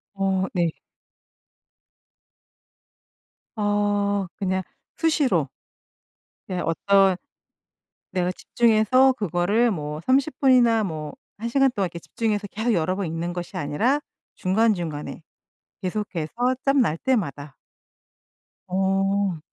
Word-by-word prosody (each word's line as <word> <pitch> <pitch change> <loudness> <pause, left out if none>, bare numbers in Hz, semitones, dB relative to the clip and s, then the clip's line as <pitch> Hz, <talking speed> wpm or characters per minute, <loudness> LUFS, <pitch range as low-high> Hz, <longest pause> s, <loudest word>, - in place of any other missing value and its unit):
어. 190 -1 +1
네. 175 -2 +2 2.9
어 205 -1 +1
그냥 190 -1 -1 0.4
수시로. 260 - +2 1.0
네 185 - -3
어떤 195 +3 +3 0.9
내가 180 0 0
집중해서 240 +5 +3
그거를 205 - +1
뭐 150 -4 -4
30 270 +2 +1
분이나 240 -5 +5
뭐 155 -4 -5 0.2
1 235 +2 -4
시간 270 +1 +4
동안 195 -7 -1
집중해서 205 +4 -2
계속 220 +4 -1
여러 185 0 0
번 200 - -2
읽는 165 +2 -3
것이 175 -1 -5
아니라 215 - +1 0.4
중간중간에 185 -7 0 0.6
계속해서 185 -4 -3 0.3
짬 275 0 +4
날 165 -10 +2
때마다. 150 - -2 1.1
어. 195 -1 +1
195 Hz, 185 characters per minute, -24 LUFS, 175-225 Hz, 2.9 s, 분이나